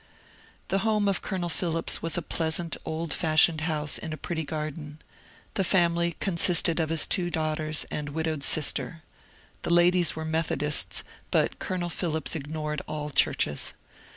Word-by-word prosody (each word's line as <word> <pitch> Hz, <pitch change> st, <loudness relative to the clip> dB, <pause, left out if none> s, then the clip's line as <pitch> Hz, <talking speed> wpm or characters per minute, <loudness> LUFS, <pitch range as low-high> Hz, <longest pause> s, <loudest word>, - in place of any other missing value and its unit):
The 195 Hz, -, +2 dB
home 210 Hz, 0 st, +1 dB
of 195 Hz, -2 st, +1 dB
Colonel 185 Hz, -3 st, -3 dB
Phillips 165 Hz, -1 st, -2 dB
was 165 Hz, 0 st, +1 dB
a 175 Hz, -, -2 dB
pleasant 165 Hz, +1 st, -2 dB
old 160 Hz, -1 st, -3 dB
fashioned 160 Hz, 0 st, +3 dB
house 155 Hz, -2 st, -1 dB
in 160 Hz, -, -5 dB
a -, -, -5 dB
pretty 160 Hz, +2 st, -3 dB
garden. 150 Hz, 0 st, -5 dB, 0.6 s
The 195 Hz, -, +1 dB
family 170 Hz, -2 st, +2 dB
consisted 170 Hz, -2 st, +3 dB
of 160 Hz, -1 st, 0 dB
his 165 Hz, -1 st, +4 dB
two 175 Hz, -2 st, +1 dB
daughters 155 Hz, -2 st, -2 dB
and 150 Hz, -1 st, -3 dB
widowed 160 Hz, 0 st, -2 dB
sister. 155 Hz, +2 st, +3 dB, 0.6 s
The -, -, -4 dB
ladies 175 Hz, -1 st, +5 dB
were 160 Hz, 0 st, -4 dB
Methodists, 160 Hz, -2 st, 0 dB, 0.3 s
but -, -, +1 dB
Colonel 180 Hz, -2 st, -3 dB
Phillips 160 Hz, -4 st, -1 dB
ignored 150 Hz, 0 st, -4 dB
all 150 Hz, -1 st, -4 dB
churches. 75 Hz, -, +1 dB
160 Hz, 150 wpm, -27 LUFS, 155-175 Hz, 0.6 s, ladies